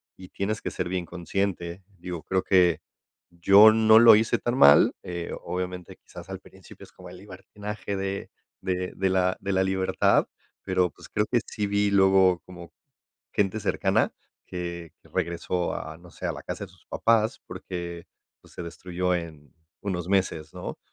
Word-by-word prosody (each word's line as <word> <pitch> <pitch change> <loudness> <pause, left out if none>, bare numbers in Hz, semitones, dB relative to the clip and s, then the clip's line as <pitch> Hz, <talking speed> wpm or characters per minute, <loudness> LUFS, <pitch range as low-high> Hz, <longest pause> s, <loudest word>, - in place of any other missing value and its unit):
y 90 -1 -13
tienes 110 +2 -3
que - - -3
ser - - -4
bien 90 -2 -2
consciente, 90 0 -3
digo, 85 -2 -6
creo 95 -1 -1
que 90 -4 +3 0.5
yo 100 +5 +7
no 110 0 +6
lo 115 -1 +9
hice 110 +1 +2
tan 120 +1 -2
mal, 70 - +7
eh, 85 -1 -6
obviamente, 90 -1 -5
quizás 90 +1 -13
al 95 - -6
principio 95 0 -16
es - - -15
como 90 -1 -13
el 90 - -11
libertinaje 100 +1 -7
de 95 0 -4 0.3
de 90 -1 -3
de 95 0 0
la 95 0 +1
de 100 0 -3
la 95 0 +2
libertad, 95 0 +2 0.3
pero, 90 -2 0
pues, - - -15
creo 105 - 0
que 120 - +3
sí 105 - -3
vi 100 0 +1
luego 95 -2 +4
como 85 -2 -12 0.6
gente 100 +1 0
cercana - - +1 0.3
que 85 -2 -6
regresó 85 +1 -2
a, 80 +1 -6
no 90 0 -16
sé, - - -6
a - - -1
la - - -9
casa - - -5
de - - -14
sus - - -24
papás 115 -1 +1
porque, 85 -1 -7 0.3
pues, - - -20
se - - -6
destruyó 90 +2 -3
en 75 -5 -9 0.3
unos 90 -3 -4
meses, 95 -5 -1
¿no?, - - -7
90 Hz, 170 wpm, -26 LUFS, 85-100 Hz, 0.6 s, lo